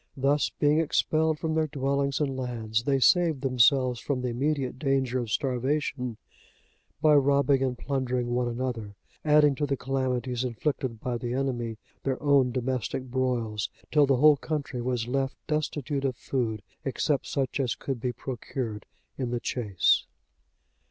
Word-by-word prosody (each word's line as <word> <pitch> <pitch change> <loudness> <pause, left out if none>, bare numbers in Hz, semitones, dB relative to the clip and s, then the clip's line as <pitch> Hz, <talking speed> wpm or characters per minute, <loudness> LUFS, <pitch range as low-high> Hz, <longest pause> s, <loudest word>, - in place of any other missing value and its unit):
Thus, 140 +2 +2
being 150 +1 +2
expelled 160 0 +1
from 160 +1 -2
their 160 0 +1
dwellings 140 -1 0
and 140 -3 0
lands, 115 -3 -2
they 135 -1 +2
saved 170 -2 +4
themselves 130 -1 +3
from 140 -3 -2
the 125 - 0
immediate 135 +1 -1
danger 135 -3 +1
of 120 -3 -4
starvation 130 -1 -1 0.9
by 155 -1 +6
robbing 140 -1 +4
and 130 -2 0
plundering 125 -3 -1
one 125 0 +1
another, 120 -4 -3 0.3
adding 150 -1 +5
to 145 +2 -2
the 140 0 0
calamities 130 -1 -1
inflicted 125 -1 -2
by 120 -2 -2
the 120 +1 -3
enemy 120 -4 -2 0.2
their 135 -1 -1
own 140 -3 +3
domestic 130 0 -2
broils, 120 -6 -1 0.2
till 150 -2 +5
the 135 -2 +3
whole 150 +2 +6
country 145 -4 -3
was 120 -2 -1
left 135 +1 -1
destitute 145 -2 -2
of 130 -2 0
food 115 -5 -2 0.2
except 140 +1 0
such 135 -1 -1
as 125 -4 0
could 130 -4 -4
be 125 - 0
procured 120 -3 -5 0.3
in 125 -2 -1
the 120 0 -1
chase. 105 -8 +1
130 Hz, 150 wpm, -27 LUFS, 125-140 Hz, 0.9 s, by